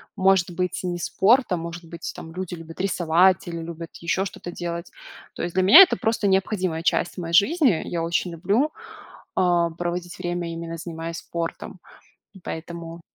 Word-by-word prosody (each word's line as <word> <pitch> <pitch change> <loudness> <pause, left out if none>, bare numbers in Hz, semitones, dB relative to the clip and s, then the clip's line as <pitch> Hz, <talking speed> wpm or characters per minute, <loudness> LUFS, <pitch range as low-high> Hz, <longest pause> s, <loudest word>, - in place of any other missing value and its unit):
может 190 -2 +3
быть 180 +1 -2
не 175 -1 -2
спорт, 225 +8 +3
а 180 - +2
может 170 +1 -6
быть 170 0 -7
там 160 - -9
люди 180 0 -5
любят 165 -1 -11
рисовать 180 -1 +3
или 170 -1 -4
любят 165 0 -8
еще 180 +3 -1
что-то 175 -2 -7
делать. 170 0 -5 0.5
То - - -4
есть 170 0 -3
для 185 - +2
меня- 285 - +10
это 370 - +1
просто 225 -2 0
необходимая 190 -3 0
часть 175 +1 0
моей 170 -2 -5
жизни. 225 - +4
Я 170 - -3
очень 170 +1 -1
люблю, 205 - +1 0.6
а, 175 -2 +2
проводить 175 +1 -4
время, 175 -1 -3
именно 165 0 -6
занимаясь 165 0 -6
спортом, 170 +2 -5 0.6
поэтому 165 0 -7
175 Hz, 165 wpm, -24 LUFS, 170-185 Hz, 0.6 s, меня